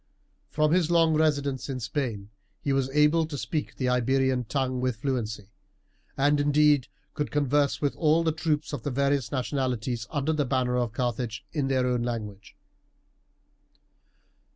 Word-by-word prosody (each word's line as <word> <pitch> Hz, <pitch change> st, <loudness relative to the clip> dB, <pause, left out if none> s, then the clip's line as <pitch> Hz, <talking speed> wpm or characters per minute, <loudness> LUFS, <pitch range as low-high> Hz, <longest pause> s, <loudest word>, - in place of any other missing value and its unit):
From 155 Hz, 0 st, +1 dB
his 170 Hz, -2 st, +2 dB
long 165 Hz, -2 st, +4 dB
residence 145 Hz, -4 st, 0 dB
in 130 Hz, -1 st, -3 dB
Spain 110 Hz, -4 st, -3 dB, 0.3 s
he 140 Hz, -, -1 dB
was 135 Hz, -1 st, +1 dB
able 150 Hz, +3 st, +3 dB
to 150 Hz, -2 st, -5 dB
speak 155 Hz, +2 st, -3 dB
the 130 Hz, -, -2 dB
Iberian 130 Hz, +1 st, +1 dB
tongue 130 Hz, 0 st, -1 dB
with 130 Hz, -2 st, 0 dB
fluency, 110 Hz, -5 st, -3 dB, 0.7 s
and 145 Hz, +1 st, +3 dB
indeed 145 Hz, -2 st, +3 dB, 0.3 s
could 150 Hz, -, -2 dB
converse 145 Hz, -1 st, +1 dB
with 145 Hz, -2 st, 0 dB
all 160 Hz, 0 st, +3 dB
the 160 Hz, -, +2 dB
troops 155 Hz, -1 st, -2 dB
of 145 Hz, -, -3 dB
the 145 Hz, -, -3 dB
various 140 Hz, -1 st, 0 dB
nationalities 125 Hz, -3 st, -2 dB
under 150 Hz, +1 st, -1 dB
the 150 Hz, -1 st, +1 dB
banner 130 Hz, -2 st, 0 dB
of 120 Hz, -2 st, 0 dB
Carthage 120 Hz, -2 st, -3 dB
in 145 Hz, -4 st, -1 dB
their 130 Hz, -1 st, +1 dB
own 125 Hz, -1 st, 0 dB
language. 105 Hz, -4 st, -5 dB
135 Hz, 155 wpm, -27 LUFS, 125-150 Hz, 0.7 s, long